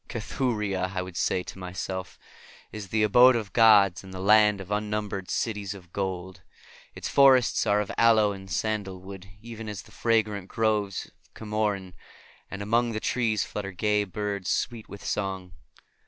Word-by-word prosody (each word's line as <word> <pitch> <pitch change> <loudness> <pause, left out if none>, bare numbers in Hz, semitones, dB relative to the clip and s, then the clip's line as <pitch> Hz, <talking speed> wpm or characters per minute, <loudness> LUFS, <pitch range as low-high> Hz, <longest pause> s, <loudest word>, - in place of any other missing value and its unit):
"Cathuria," 105 -6 -2
I 90 - -1
would 90 -1 -10
say 90 +2 0
to 95 - -10
myself, 95 0 -5 0.5
"is 105 -2 -7
the 110 +3 +1
abode 125 +4 +6
of 105 -4 -4
gods 105 -6 +5
and 95 - -11
the 95 - -7
land 105 +1 +5
of 95 +1 -9
unnumbered 105 -2 -3
cities 105 -3 -2
of 90 -3 -15
gold. 95 -1 -4 0.5
Its - - -5
forests 135 -3 +4
are 105 0 +3
of 105 - -5
aloe 110 -3 +5
and 95 -1 -9
sandalwood, 95 -3 -4 0.2
even 115 -2 -8
as 100 -2 -6
the - - -19
fragrant 105 -4 0
groves 105 -3 -1 0.2
of - - -33
Camorin, 105 -4 -2 0.6
and 100 0 -6
among 115 +2 +1
the 110 - -2
trees 110 -4 0
flutter 100 -2 -6
gay 105 +3 +1
birds 100 -1 -4
sweet 115 -3 -2
with 100 - -10
song. 95 -3 -3
105 Hz, 160 wpm, -26 LUFS, 95-110 Hz, 0.6 s, abode